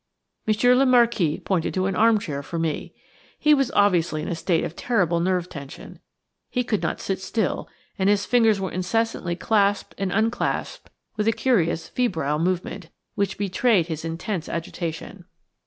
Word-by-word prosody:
Monsieur 220 +4 +4
le 265 +2 +4
Marquis 235 -11 +3
pointed 180 -4 -1
to 185 0 +1
an 195 -1 -1
armchair 210 -11 +2
for 165 +4 -6
me. 165 -2 -2 0.5
He 300 - +4
was 275 -4 +2
obviously 175 -6 +2
in - - -5
a - - -1
state 165 0 0
of 160 - -5
terrible 180 -8 +1
nerve 180 0 0
tension. 140 -5 -10 0.5
He 250 - 0
could 215 -4 -1
not - - -2
sit 190 -1 -3
still, 205 +1 -2 0.3
and 190 +1 +3
his 205 0 +2
fingers 225 -4 +3
were 190 -1 -3
incessantly 185 -1 -1
clasped 205 +1 +1
and 195 -2 -1
unclasped 220 +4 -1 0.3
with 210 0 0
a - - +5
curious, 180 -9 +1
febrile 160 - -1
movement, 180 0 -2 0.2
which 200 -1 -1
betrayed 195 -2 +2
his 160 -1 -4
intense 165 +2 -4
agitation. 165 0 -5
190 Hz, 160 wpm, -24 LUFS, 170-220 Hz, 0.5 s, a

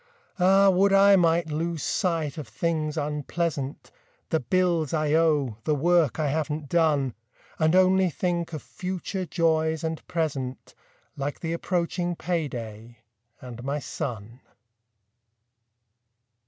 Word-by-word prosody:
Ah, 195 +2 +5
would 195 +2 +3
I 195 0 +7
might 170 -2 +2
lose 165 0 -2
sight 165 -5 -1
of 145 - -7
things 155 +5 -2
unpleasant: 150 -1 -3 0.4
The 160 - +2
bills 170 +2 +1
I 155 -1 +1
owe; 150 -8 +2
the 150 - +1
work 165 -1 +2
I 150 -2 +1
haven't 150 0 -2
done. 150 -7 +2 0.5
And 160 +2 +3
only 185 0 +4
think 170 0 -2
of 155 -4 -6
future 185 0 -5
joys 160 -1 +1
and 160 0 -3
present, 135 -6 -3 0.4
Like 140 +1 -4
the 165 -1 -2
approaching 175 0 -1
payday, 120 -10 -4 0.4
and 120 -1 -9
my 140 +2 -2
son. 115 -5 -6
160 Hz, 120 wpm, -26 LUFS, 145-175 Hz, 0.5 s, I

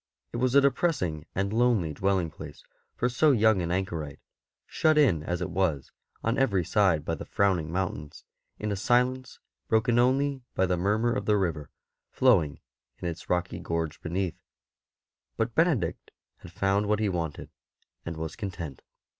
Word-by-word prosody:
It - - -2
was 130 +2 +1
a 140 - +8
depressing 125 - 0
and 100 +2 -1
lonely 115 -9 +2
dwelling 95 -1 0
place 75 -2 -10 0.3
for 125 - +1
so 135 +5 +3
young 110 -5 +4
an 85 - -2
anchorite, 85 -6 -3 0.5
shut 155 -1 +2
in 115 - +4
as 90 +3 -3
it 90 0 -3
was 85 -7 -1 0.3
on 115 +4 0
every 100 -10 +2
side 90 -7 +2
by 85 - -1
the 80 - -5
frowning 90 -6 0
mountains, 85 -5 -4 0.3
in 105 0 -3
a - - 0
silence 125 +5 +1 0.3
broken 115 +2 +2
only 135 +2 +2
by 95 - +3
the 90 0 +1
murmur 105 +6 +1
of 130 - -3
the 105 -1 +4
river 80 -6 -2 0.4
flowing 90 - +3 0.4
in 90 - -5
its 85 -1 -6
rocky 90 0 -1
gorge 85 -2 -3
beneath; 90 +1 -3 1.0
but 115 +1 -1
Benedict 150 - +1 0.3
had 90 - -13
found 100 +2 +1
what 105 0 +2
he 105 0 0
wanted, 85 -5 -4 0.5
and 85 -1 -6
was 80 -1 -5
content. 85 - -6
95 Hz, 165 wpm, -27 LUFS, 85-120 Hz, 1.0 s, a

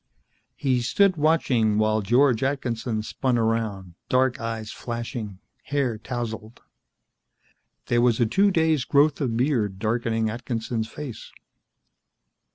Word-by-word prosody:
He 130 -3 0
stood 190 +10 +3
watching 135 -9 +2
while 110 0 +2
George 120 +3 +3
Atkinson 120 -5 -2
spun 125 +2 -1
around, 110 -5 -1 0.2
dark 130 0 +2
eyes 115 -1 -4
flashing, 115 -4 -5 0.3
hair 135 -5 -1
tousled. 115 -1 -6 1.2
There 120 0 +2
was 120 -2 +3
a 120 - +4
two 195 - +3
days' 160 -6 +2
growth 145 +3 +3
of 120 -5 -1
beard 120 -7 0
darkening 115 +1 0
Atkinson's 115 0 -3
face. 130 -3 -8
120 Hz, 115 wpm, -24 LUFS, 110-135 Hz, 1.2 s, a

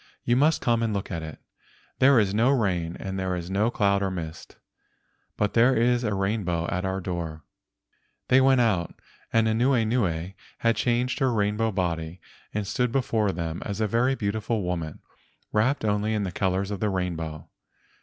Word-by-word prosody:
You 120 - +2
must 150 +5 +3
come 115 -1 +2
and 110 -2 0
look 100 - -4
at 85 -3 -3
it. 80 -1 -7 0.6
There 135 -1 +6
is 100 -3 +1
no 115 +5 +3
rain 90 -10 0
and 95 0 -4
there 95 -1 -1
are 90 - -3
no 95 +6 0
clouds 100 -4 +1
or 95 - 0
mist, 85 -3 -7 0.8
but 105 -1 0
there 120 +3 +5
is 120 +1 +2
a 105 -3 0
rainbow 95 -4 -1
at 90 +1 -2
our 95 0 -1
door." 85 -4 -5 0.8
They 130 +1 +5
went 130 -1 +5
out, 95 -8 +1 0.4
but 115 0 +3
Anuenue 110 -7 +1 0.2
had 115 0 +2
changed 125 +2 0
her 135 -3 +2
rainbow 105 0 +1
body 85 -3 -2 0.3
and 105 -1 -2
stood 125 +4 0
before 115 -5 +1
them 85 -1 -4
as 100 0 -4
a 110 - +2
very 120 +5 +2
beautiful 110 0 -2
woman, 85 -3 -4 0.5
wrapped 110 +4 +1
only 105 +1 +1
in 105 - 0
the 95 - -3
colors 95 +2 -1
of 100 - -3
the 105 - 0
rainbow. 85 -5 -3
105 Hz, 175 wpm, -26 LUFS, 90-115 Hz, 0.8 s, There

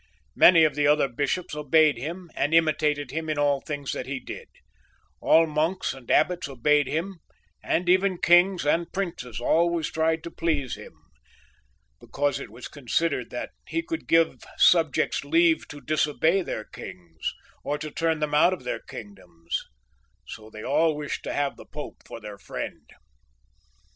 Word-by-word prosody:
Many 170 -2 +7
of 155 - +3
the 145 -1 +1
other 150 -1 +4
bishops 145 +8 -2
obeyed 150 0 +3
him 170 +5 -6
and 145 +3 -1
i9iitated 155 -3 +2
him 160 +1 -4
in 155 - -1
all 145 -1 +2
that 145 -3 -4
he 135 0 -3
did; - - -9 0.7
all 165 +1 +5
monks 160 +4 -1
and 130 -3 -14
abbots 175 -3 +2
obeyed 145 +2 +2
him, 170 +4 -3 0.4
and 175 +1 -1
even 185 +1 +3
kings 175 0 +4
and 165 +3 +1
princes 170 - -4
always 165 +5 +1
tried 160 0 0
to 170 - -7
please 150 -6 -1
him, - - -9 1.1
because 145 -1 -1
it - - -8
was 120 +4 -9
considered 150 +4 -1
that - - -5 0.2
he 330 - -2
could 325 -1 -5
give, 165 -6 +2
subjects 160 -7 +3
leave 165 +2 +3
to 145 - -9
disobey 155 +4 +1
their 110 - -4
kings, 85 -6 -7 0.3
or 145 - -1
to 155 +1 -6
turn 165 0 0
them 150 -1 -1
out 160 +5 +5
of 180 - -7
their 125 - -3
kingdoms; 90 -6 -7 0.6
so 110 0 -10
they 110 0 -10
all 155 +3 +2
wished 150 -1 -4
to - - -4
have 145 -1 -1
the - - -12
Pope 150 0 -7
for - - -8
their 105 -2 -9
friend. - - -7
150 Hz, 160 wpm, -26 LUFS, 140-165 Hz, 1.1 s, Many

